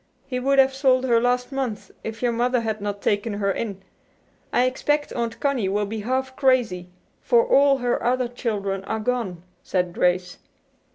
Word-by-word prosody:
He 255 Hz, -2 st, -3 dB
would 275 Hz, +2 st, +1 dB
have 270 Hz, 0 st, +5 dB
sold 260 Hz, -1 st, +2 dB
her 235 Hz, -2 st, +3 dB
last 245 Hz, +1 st, 0 dB
month 260 Hz, -6 st, -4 dB
if 225 Hz, +2 st, -6 dB
your 240 Hz, -, +3 dB
mother 245 Hz, +1 st, +1 dB
had 220 Hz, -2 st, -3 dB
not 205 Hz, 0 st, -4 dB
taken 205 Hz, +2 st, 0 dB
her 200 Hz, -1 st, 0 dB
in. 195 Hz, -2 st, -4 dB, 0.7 s
I 245 Hz, -, +3 dB
expect 290 Hz, +3 st, 0 dB
Aunt 235 Hz, -1 st, -3 dB
Connie 265 Hz, -9 st, 0 dB
will 205 Hz, +1 st, 0 dB
be 220 Hz, +2 st, -5 dB
half 260 Hz, +4 st, -2 dB
crazy, 245 Hz, -10 st, +1 dB, 0.3 s
for 475 Hz, 0 st, +3 dB
all 280 Hz, -, +4 dB
her 245 Hz, -1 st, -1 dB
other 250 Hz, 0 st, +1 dB
children 205 Hz, -5 st, -3 dB
are 220 Hz, -, -2 dB
gone," 215 Hz, -7 st, -2 dB, 0.2 s
said 180 Hz, -2 st, -1 dB
Grace. 180 Hz, 0 st, 0 dB
240 Hz, 175 wpm, -23 LUFS, 205-260 Hz, 0.7 s, have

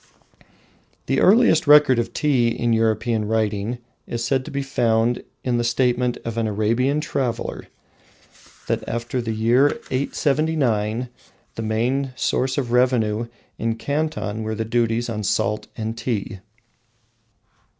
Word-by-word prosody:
The -, -, +1 dB
earliest 200 Hz, -, +5 dB
record 145 Hz, -4 st, +6 dB
of 120 Hz, -, -2 dB
tea 140 Hz, -6 st, +2 dB
in 115 Hz, 0 st, 0 dB
European 110 Hz, 0 st, +1 dB
writing 110 Hz, +1 st, -1 dB, 0.3 s
is 120 Hz, 0 st, -3 dB
said 135 Hz, 0 st, +1 dB
to -, -, -7 dB
be 140 Hz, 0 st, -3 dB
found 120 Hz, -3 st, +1 dB, 0.2 s
in 125 Hz, -2 st, 0 dB
the -, -, 0 dB
statement 125 Hz, 0 st, +1 dB
of 115 Hz, 0 st, -3 dB
an 115 Hz, -, 0 dB
Arabian 115 Hz, +8 st, +1 dB
traveller, 130 Hz, -6 st, -3 dB, 1.0 s
that -, -, -1 dB
after 120 Hz, +2 st, -2 dB
the 115 Hz, -1 st, -3 dB
year 120 Hz, -, +3 dB
879 130 Hz, -5 st, 0 dB, 0.4 s
the -, -, -5 dB
main 125 Hz, +5 st, -1 dB
sources 130 Hz, 0 st, 0 dB
of 125 Hz, -4 st, -2 dB
revenue 120 Hz, -3 st, +2 dB, 0.3 s
in 115 Hz, 0 st, -1 dB
Canton 145 Hz, -5 st, -2 dB
were 110 Hz, 0 st, -3 dB
the 110 Hz, +1 st, -3 dB
duties 115 Hz, 0 st, 0 dB
on 110 Hz, -2 st, -3 dB
salt 105 Hz, +1 st, -1 dB
and 110 Hz, +1 st, -3 dB
tea. 110 Hz, -4 st, -3 dB
120 Hz, 130 wpm, -22 LUFS, 110-130 Hz, 1.0 s, record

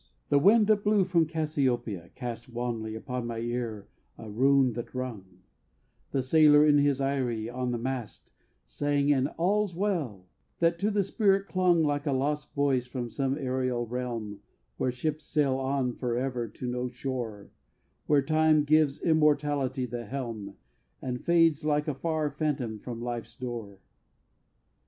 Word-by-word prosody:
II -, -, -34 dB, 0.2 s
The 145 Hz, -, +5 dB
wind 210 Hz, +7 st, +6 dB
that 210 Hz, -1 st, +2 dB
blew 210 Hz, -1 st, +4 dB
from 170 Hz, -3 st, +2 dB
Cassiopeia 135 Hz, -, -1 dB
cast 120 Hz, -2 st, -6 dB
Wanly 115 Hz, -2 st, -3 dB
upon 125 Hz, +1 st, -4 dB
my 115 Hz, -1 st, -4 dB
ear 115 Hz, -3 st, -3 dB, 0.3 s
a 110 Hz, -2 st, -9 dB
rune 135 Hz, +2 st, +3 dB
that 120 Hz, +2 st, -7 dB
rung; 95 Hz, -8 st, -6 dB, 0.7 s
The 135 Hz, -, -1 dB
sailor 150 Hz, +2 st, +6 dB
in 145 Hz, -1 st, +5 dB
his 140 Hz, -1 st, +2 dB
eyrie 130 Hz, -5 st, -1 dB
on 125 Hz, +1 st, -3 dB
the 120 Hz, -, -1 dB
mast 125 Hz, -2 st, -5 dB, 0.3 s
Sang 145 Hz, 0 st, 0 dB
an 135 Hz, -1 st, +1 dB
"All's 195 Hz, +1 st, +1 dB
well," 160 Hz, -, -2 dB, 0.3 s
that 170 Hz, 0 st, +2 dB
to 205 Hz, -, +1 dB
the 205 Hz, -1 st, +1 dB
spirit 195 Hz, 0 st, +2 dB
clung 180 Hz, -3 st, +3 dB
Like 145 Hz, 0 st, 0 dB
a 140 Hz, -, +2 dB
lost 145 Hz, +3 st, -2 dB
voice 135 Hz, -3 st, +1 dB
from 125 Hz, -2 st, -5 dB
some 135 Hz, +1 st, -1 dB
aërial 130 Hz, -3 st, -1 dB
realm 115 Hz, -5 st, -4 dB, 0.4 s
Where 130 Hz, -, 0 dB
ships 155 Hz, +5 st, -3 dB
sail 140 Hz, -4 st, +1 dB
on 135 Hz, -2 st, 0 dB
forever 125 Hz, 0 st, -2 dB
to 120 Hz, -, -9 dB
no 125 Hz, +1 st, -2 dB
shore, 120 Hz, -5 st, -5 dB, 0.6 s
Where 145 Hz, -2 st, +4 dB
Time 155 Hz, 0 st, +3 dB
gives 150 Hz, -1 st, +2 dB
Immortality 145 Hz, -4 st, +2 dB
the 120 Hz, -1 st, -5 dB
helm, 115 Hz, -7 st, -5 dB, 0.4 s
And 125 Hz, -1 st, -4 dB
fades 165 Hz, -3 st, +3 dB
like 150 Hz, 0 st, +1 dB
a 150 Hz, -, 0 dB
far 155 Hz, +1 st, -1 dB
phantom 135 Hz, -7 st, -2 dB
from 120 Hz, +1 st, -7 dB
life's 120 Hz, -1 st, -5 dB
door. 115 Hz, -6 st, -6 dB
135 Hz, 155 wpm, -28 LUFS, 120-150 Hz, 0.7 s, wind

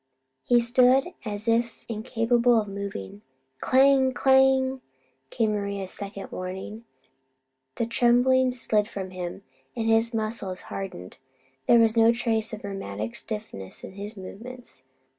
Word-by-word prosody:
He 240 Hz, -1 st, +4 dB
stood 250 Hz, +5 st, +4 dB, 0.2 s
as 210 Hz, +1 st, -5 dB
if 230 Hz, 0 st, 0 dB
incapable 235 Hz, +1 st, +2 dB
of 210 Hz, -, -3 dB
moving. 195 Hz, -, -6 dB, 0.4 s
"Clang! 265 Hz, 0 st, +4 dB
Clang!" 265 Hz, 0 st, +3 dB, 0.5 s
came 220 Hz, -, 0 dB
Maria's 200 Hz, -2 st, -3 dB
second 200 Hz, -1 st, -6 dB
warning. 190 Hz, +5 st, -6 dB, 0.9 s
The 235 Hz, -, -1 dB
trembling 245 Hz, +2 st, +3 dB
slid 220 Hz, -4 st, +1 dB
from 190 Hz, -3 st, -6 dB
him, 180 Hz, +1 st, -6 dB, 0.3 s
and 225 Hz, -1 st, -2 dB
his 225 Hz, +1 st, +3 dB
muscles 215 Hz, -5 st, -3 dB
hardened. 180 Hz, -, -7 dB, 0.5 s
There 235 Hz, -, +7 dB
was 225 Hz, -1 st, +4 dB
no 225 Hz, 0 st, +6 dB
trace 225 Hz, -2 st, 0 dB
of 215 Hz, -1 st, -7 dB
rheumatic 115 Hz, -, -5 dB
stiffness 210 Hz, -, -6 dB
in -, -, -8 dB
his 205 Hz, +3 st, -7 dB
movements. 230 Hz, -, -7 dB
225 Hz, 125 wpm, -26 LUFS, 200-245 Hz, 0.9 s, There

